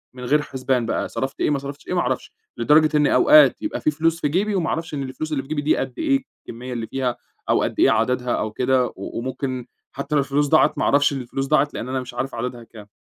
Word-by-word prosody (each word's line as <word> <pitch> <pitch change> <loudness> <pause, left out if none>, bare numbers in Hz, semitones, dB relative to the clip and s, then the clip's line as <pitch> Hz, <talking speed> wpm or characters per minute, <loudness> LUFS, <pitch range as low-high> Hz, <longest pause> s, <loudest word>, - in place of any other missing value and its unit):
من 125 - -8
غير 150 +4 +3
حُسبان 130 -3 -1
بقى. - - -2
صرفت 135 +1 -4
إيه، - - +1
ما 145 -2 +1
صرفتش 140 +1 -9
إيه، - - -3
ما 175 - +2
أعرفش. 130 -3 -2 0.3
لدرجة 150 +5 +4
إن 150 -1 +3
أوقات 300 -1 +6
يبقى 315 - -3
في 155 - +2
فلوس 165 +2 0
في - - +2
جيبي 195 +7 0
وما 175 -4 0
اعرفش 165 -1 -3
إن 140 -2 -2
الفلوس 135 +4 -5
اللي 135 -3 -1
في 135 - -16
جيبي 155 -1 -1
دي 150 +2 +2
قد 130 -2 -3
إيه، 275 -4 +1 0.2
الكمِّية 125 +2 -7
اللي 115 -2 -4
فيها 130 -2 -2 0.3
أو - - +3
قد - - -3
إيه - - +5
عددها 125 +2 0
أو 110 - -2
كده 125 +3 +2
و - - -9 0.3
وممكن 130 0 -4 0.2
حتّى 145 +2 -4
لو 140 - +4
الفلوس 140 +2 0
ضاعت 155 +2 +4
ما - - 0
أعرفش 145 +1 +3
إن 135 - -3
الفلوس 135 +2 -3
ضاعت 150 0 +2
لإن 125 - -5
أنا 130 0 -1
مش 125 - -9
عارف 125 +2 -4
عددها 120 0 -4
كام. 110 -2 -14
135 Hz, 255 wpm, -22 LUFS, 125-150 Hz, 0.3 s, أوقات